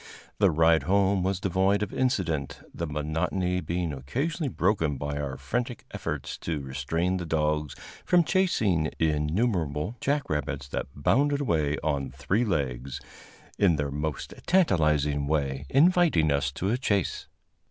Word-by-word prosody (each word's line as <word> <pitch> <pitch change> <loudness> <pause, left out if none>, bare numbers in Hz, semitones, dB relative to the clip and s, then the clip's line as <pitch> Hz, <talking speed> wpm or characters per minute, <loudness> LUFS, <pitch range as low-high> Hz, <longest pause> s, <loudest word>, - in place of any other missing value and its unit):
The 100 -2 +5
ride 80 0 +4
home 100 0 +3
was 95 0 0
devoid 95 +2 +2
of - - -5
incident, 85 - -1
the 85 - -3
monotony 80 +5 -1
being 85 -3 -2
occasionally 140 - -2
broken 85 - +1
by 70 +1 -3
our 70 -2 -4
frantic 120 - -3
efforts - - -4
to 80 -3 -3
restrain 70 +7 -1
the 90 - -4
dogs 75 -2 0 0.3
from 175 -1 +4
chasing 105 - +1
innumerable 80 - 0
jack 145 +1 0
rabbits 70 -2 -3
that - - -3
bounded 140 - +2
away 75 - +1
on 70 -3 -1
three 75 - 0
legs, 65 - -2 0.6
in 95 -5 +4
their 75 -1 -2
most 75 +1 -4
tantalizing 75 - +2
way, 70 -2 -1
inviting 155 - +4
us 70 0 +1
to 95 +7 -1
a 125 - 0
chase. 100 -8 -1
80 Hz, 140 wpm, -27 LUFS, 75-100 Hz, 0.6 s, The